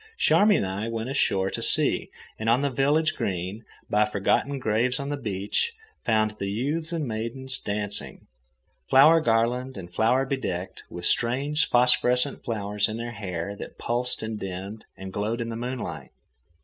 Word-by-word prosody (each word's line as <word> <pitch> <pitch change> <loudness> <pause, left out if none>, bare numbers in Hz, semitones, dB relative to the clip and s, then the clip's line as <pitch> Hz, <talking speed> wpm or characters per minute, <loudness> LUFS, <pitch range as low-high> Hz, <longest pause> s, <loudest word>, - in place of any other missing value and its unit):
Charmian 205 - +4
and 95 - -3
I 105 +3 -3
went 115 +2 -3
ashore 95 -8 +1
to - - -4
see, - - +2 0.3
and 110 +1 0
on 120 +3 +4
the 140 -1 0
village 145 +5 +2
green, 95 +4 -3 0.2
by 105 +1 +3
forgotten 105 +7 +1
graves 125 +1 +1
on 140 0 -4
the 145 - -1
beach, 105 - -2 0.3
found 110 -2 +2
the 100 - -2
youths 145 - -1
and 160 -5 -2
maidens 120 +4 -3
dancing, 105 0 -3 0.6
flower 155 +5 +7
garlanded 120 0 +1
and 90 -2 -9
flower 125 +6 +3
bedecked, 95 -9 -3
with 85 0 -6
strange 140 +6 +2
phosphorescent 125 +2 +3
flowers 105 -2 -1
in 110 - -4
their 120 0 -4
hair 100 -3 -4
that - - -9
pulsed 120 0 -1
and 110 -1 -4
dimmed 95 +3 -6
and 95 0 -8
glowed 110 +4 -1
in 115 0 -3
the 115 - -4
moonlight. 125 +2 -5
115 Hz, 160 wpm, -26 LUFS, 105-130 Hz, 0.6 s, flower